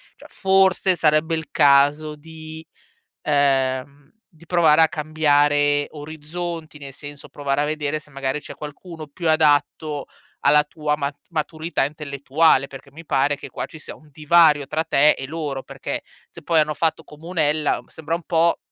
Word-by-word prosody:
cioè - - -17
forse 190 -1 +3
sarebbe 155 0 +2
il 160 -3 -6
caso 145 +2 +3
di 160 +1 -10 0.6
ehm, 140 0 0 0.2
di 165 +1 -19
provare 165 -3 +4
a 160 - +5
cambiare 145 -2 +2
orizzonti, 155 +1 -7
nel 140 -2 -9
senso 145 +1 -11
provare 140 -1 -2
a - - +1
vedere 150 0 -2
se 150 - -19
magari 135 +1 -3
c'è - - -10
qualcuno 155 +2 -9
più 165 +4 -4
adatto 150 -1 +1 0.3
alla 150 0 +4
tua 150 0 -2
mat 140 -1 -3
maturità 160 -1 -2
intellettuale, 145 +1 +1
perché 140 0 -12
mi 165 +3 -12
pare 140 0 +1
che - - -10
qua - - -5
ci 160 - -12
sia - - -9
un 155 - -21
divario 155 -1 +4
tra 155 +3 -2
te 150 0 +4
e 135 - -2
loro. 145 -3 -4
Perché, - - -6 0.3
se - - -13
poi 165 -2 +3
hanno 150 0 0
fatto 160 +1 -1
comunella, 155 -1 -1
sembra 160 +1 -5
un 170 - -10
po', 170 +1 +2
150 Hz, 160 wpm, -22 LUFS, 145-160 Hz, 0.6 s, a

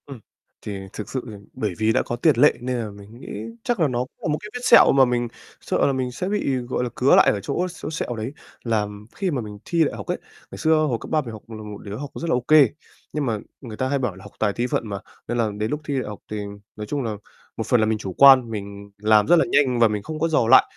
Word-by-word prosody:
Ừm. 135 -4 -9 0.4
Thì 100 -2 -5
thực 105 - -6
sự 130 - -2
thì - - -9 0.2
bởi 105 -4 -2
vì 110 0 +2
đã - - +2
có 120 - -3
tiền 150 +4 +3
lệ 145 +4 +6
nên 125 0 -2
là 115 -3 -3
mình 100 +3 -13
nghĩ - - -11 0.4
chắc 240 -4 -1
là 160 - +4
nó 125 -3 -2
cũng 125 +1 -3
là - - -3
một - - 0
cái 210 - -8
vết 250 - -4
sẹo - - +7
mà 135 -1 +6
mình 120 -1 0 0.3
sợ - - +1
là 140 - +1
mình 130 -1 -2
sẽ 150 +10 -3
bị, 200 -10 0
gọi 125 0 -2
là, 125 - -2
cứa 130 - +5
lại - - +6
ở 100 - -2
chỗ 175 - -1 0.2
chỗ - - -4
sẹo 155 -6 -3
đấy, 110 +3 -4 0.3
là 110 -3 0 0.3
khi 190 -3 -1
mà 135 -5 -1
mình 105 -2 -8
thi 170 -1 +2
đại - - -1
học - - -7
ấy, - - -1 0.3
ngày - - -8
xưa 160 0 +3
hồi 125 -6 0
cấp - - -8
3 155 - +3
mình 120 -5 -7
học 110 -2 -9
là 110 - -7
một 105 -1 -7
đứa 100 -1 -6
học 140 +2 -6
rất 170 - -4
là - - +3
ô - - +2
kê. 150 -5 +7 0.4
Nhưng 150 -2 -1
mà 115 -4 0 0.2
người 115 -5 -8
ta 130 - 0
hay 140 0 +1
bảo 120 -8 -2
là 95 - -13
"học 100 - -12
tài 105 -2 +1
thi 120 +3 -1
phận" 115 - -1
mà, 100 -1 -4 0.3
nên 120 - -2
là 115 -2 +1
đến 110 +1 -2
lúc 150 - -2
thi 145 - -2
đại - - -4
học 105 - -8
thì 105 - -3 0.4
nói 105 0 -6
chung 145 +5 -2
là 110 -3 -3 0.4
một - - -1
phần 125 - +4
là 110 - +3
mình 110 0 +1
chủ 95 -3 -6
quan, 130 -2 +7
mình 100 -1 -7
làm 105 0 +4
rất 175 - +7
là 165 - +4
nhanh 130 -4 +3
và 115 - +6
mình 105 -1 -3
không 155 +6 -6
có 165 - +2
dò 150 -8 +2
lại. 130 - +8
120 Hz, 300 wpm, -23 LUFS, 110-140 Hz, 0.4 s, lại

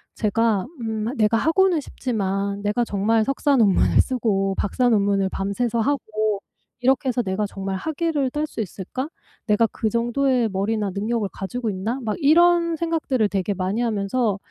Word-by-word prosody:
제가 215 -2 +1 0.2
음 220 +1 -2
'내가 220 +1 +3
하고는 340 +6 +3
싶지만 200 -6 -2
내가 210 +4 +1
정말 220 +2 +1
석사 275 +1 +1
논물을 205 -6 +4
쓰고 200 -7 0
박사 245 +5 +1
논문을 200 -3 +2
밤새서 210 +5 -1
하고 215 -6 -1 0.4
이렇게 265 +1 +2
해서 250 0 +1
내가 195 +1 -1
정말 195 -1 -4
학위를 315 - -1
딸 300 +3 -1
수 230 - -5
있을까? 215 - -5 0.4
내가 210 +1 +4
그 220 - -1
정도의 240 +1 +1
머리나 200 +1 -1
능력을 215 +2 -1
가지고 230 +4 -4
있나?' 210 +7 -3
막 215 -2 -1
이런 335 +2 +4
생각들을 315 -8 0
되게 200 0 -1
많이 190 +5 -1
하면서 215 -1 0
225 Hz, 330 characters per minute, -23 LUFS, 200-260 Hz, 0.4 s, 논물을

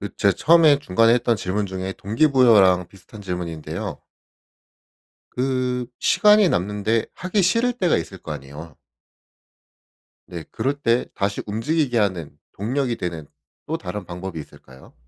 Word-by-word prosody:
그 100 -2 -7
제가 100 - +3
처음에 160 -3 +5
중간에 115 -4 +3
했던 120 -1 +1
질문 100 +1 -2
중에 95 0 -5
동기부여랑 110 - +3
비슷한 100 +3 -15
질문인데요. 90 -5 -5 1.3
그 125 -1 -1
시간이 210 -3 +4
남는데 105 - 0
하기 185 +3 -1
싫을 230 +7 +2
때가 185 -8 +1
있을 80 - -6
거 80 - -6
아니에요. 75 +2 -10 1.5
네. 85 -2 -7
그럴 140 +2 -1
때 115 +1 +2
다시 100 0 -2
움직이게 125 +5 -1
하는 90 -9 -1 0.2
동력이 120 +4 -2
되는 85 -4 -5 0.4
또 160 - -3
다른 105 - -6
방법이 90 0 -7
있을까요? 65 -3 -14
105 Hz, 300 characters per minute, -22 LUFS, 90-135 Hz, 1.5 s, 처음에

